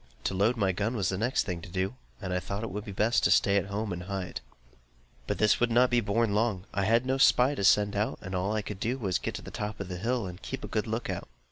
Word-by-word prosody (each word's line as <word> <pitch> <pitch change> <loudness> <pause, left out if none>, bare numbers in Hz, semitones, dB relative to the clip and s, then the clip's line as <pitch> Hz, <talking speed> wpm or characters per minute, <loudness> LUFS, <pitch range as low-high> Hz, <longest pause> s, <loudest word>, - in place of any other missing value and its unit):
To - - -1
load 105 +6 +2
my 100 -3 +2
gun 105 +6 -1
was 100 -6 0
the 95 - -1
next 120 +4 +1
thing 90 -3 -4
to - - -10
do, 95 +4 -1 0.3
and 95 -3 -4
I 90 - +1
thought 100 +4 -4
it 115 - -4
would 105 +2 -5
be 100 - -6
best 110 +3 +2
to - - +5
stay 100 - +4
at 100 - 0
home 100 0 -3
and 90 - -5
hide. 95 -2 -4 0.9
But - - -1
this 105 - +3
was 120 - +2
not 120 +2 +5
to - - +4
be 120 -1 +3
borne 110 +1 +1
long. 105 -3 0
I 100 0 0
had 115 +3 +3
no 130 +1 0
spy 135 0 +5
to 120 - -3
send 100 +1 +4
out 105 +2 0
and 95 - -7
all 95 +2 0
I 110 -1 -1
could 100 -1 -6
do 120 +5 -1
was 95 -8 0
to - - -14
get - - -3
to - - -7
the - - -9
top 105 +1 -4
of 100 -2 -5
the 90 - -4
hill, 115 +3 -1
and 90 -1 -8
keep - - -6
a - - -4
good - - -1
look - - -2
out. - - -5
105 Hz, 300 wpm, -29 LUFS, 95-115 Hz, 0.9 s, to